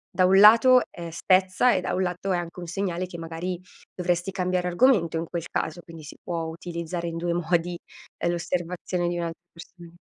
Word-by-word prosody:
da 185 - +4
un 190 +1 +5
lato, 230 +5 +8
ehm, 170 -2 -7
spezza 185 +7 +3
e - - 0
da - - -3
un 190 - 0
lato, 180 +2 -3
è - - +1
anche 175 +1 -6
un 175 - -7
segnale 180 0 -2
che 175 - -9
magari, 165 +2 -5 0.4
dovresti 175 +1 -1
cambiare 180 -1 -1
argomento 180 -3 +3
in 165 - -2
quel 170 0 -5
caso, 160 +2 -3
quindi 165 -2 -12
si 150 - -10
può 170 -2 -3
utilizzare 170 +1 -5
in 165 0 -4
due 170 0 -1
modi, 175 0 0 0.5
ehm, - - +2
l'osservazione 175 +1 -2
di 175 0 -2
un'alt 170 -1 -3 0.2
persona. 170 0 -14
175 Hz, 195 wpm, -25 LUFS, 170-185 Hz, 0.5 s, lato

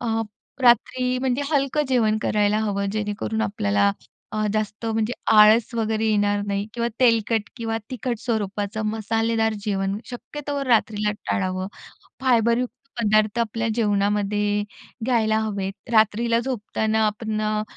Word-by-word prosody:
अ, 225 -2 0 0.4
रात्री 250 +1 +3
म्हणजे 260 +1 0
हलकं 285 0 +1
जेवण 220 -4 +2
करायला 210 0 +2
हवं. 200 -2 -1
जेणेकरून 215 +1 -2
आपल्याला 100 - +1 0.4
अ, 215 0 0
जास्त 215 +1 -2
म्हणजे 225 +1 0 0.2
आळस 215 +3 +6
वगैरे 220 -1 0
येणार 205 -1 +2
नाही 200 0 -2
किंवा 235 0 0
तेलकट 230 -3 +3
किंवा 225 -1 -2
तिखट 245 -2 -3
स्वरूपाचं, 210 -2 -2
मसालेदार 225 +1 0
जेवण 195 -1 -1
शक्यतो 285 +3 -5
रात्रीला 215 -4 +2 0.2
टाळावं. 185 0 -1 0.5
फायबरयुक्त 240 -1 +2 0.3
पदार्थ 215 0 +2
आपल्या 230 0 -1
जेवणामध्ये 205 -1 +1 0.4
घ्यायला 220 -3 +2
हवेत. 200 -3 -2 0.2
रात्रीला 225 +2 +3
झोपताना 220 -3 0
आपण 215 0 -2
अ, 215 0 0
220 Hz, 120 wpm, -23 LUFS, 205-235 Hz, 0.5 s, आळस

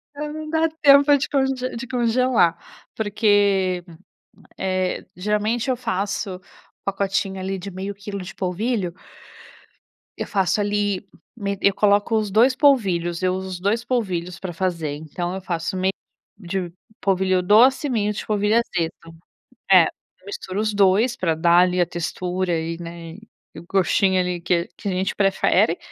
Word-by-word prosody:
É, 300 +1 -4
não 310 0 -6
dá 320 +1 +2
tempo 285 0 +7
de 270 - -3
conge 270 -2 +1 0.2
de 240 +2 -6
congelar, 240 -6 +2 0.4
porque, 205 -4 +2 0.7
eh, 185 -1 -1
geralmente, 210 +6 -1
eu 255 - +2
faço 200 -4 -3 0.4
pacotinho, 195 0 -1
ali, 190 +1 -3
de 195 +2 -7
0,5 190 +2 -5
quilo 200 0 -7
de 180 - -9
polvilho. 190 0 -2 1.2
Eu - - -4
faço 195 0 +1
ali, 205 -1 -1 0.3
me 200 -3 -3
eu 200 - +4
coloco 205 +2 +2
os 215 -1 -1
2 240 +6 +4
polvilhos. 185 - +2
Eu 185 0 +2
uso 190 -1 -6
2 215 +4 0
polvilhos 180 -9 -2
pra 185 -2 -5
fazer, 170 -4 -2
então 165 +4 -5
eu 190 - -5
faço 175 +1 -3
meio 185 +1 +1 0.5
de 185 -2 -4 0.3
polvilho 190 -1 +2
doce 235 +10 +5
e - - -4
meio 210 -4 0
de - - -6
polvilho 210 0 +1
azedo. 165 -7 -2 0.6
É, 185 -3 +8
eu 185 - -10
misturo 200 -1 -5
os 215 0 0
2 205 +5 +3
pra 165 -6 0
dar, 170 +2 +4
ali, 180 0 +2
a 175 - +3
textura 180 +1 -3
e, 165 +1 -3
né, 170 -1 -8 0.4
o 160 - -8
gostinho, 190 +1 +2
ali, 180 -1 -2
que 170 0 0
que 205 - -5
a - - 0
gente 185 +1 -1
prefere. 195 -1 +2
195 Hz, 155 wpm, -22 LUFS, 180-215 Hz, 1.2 s, É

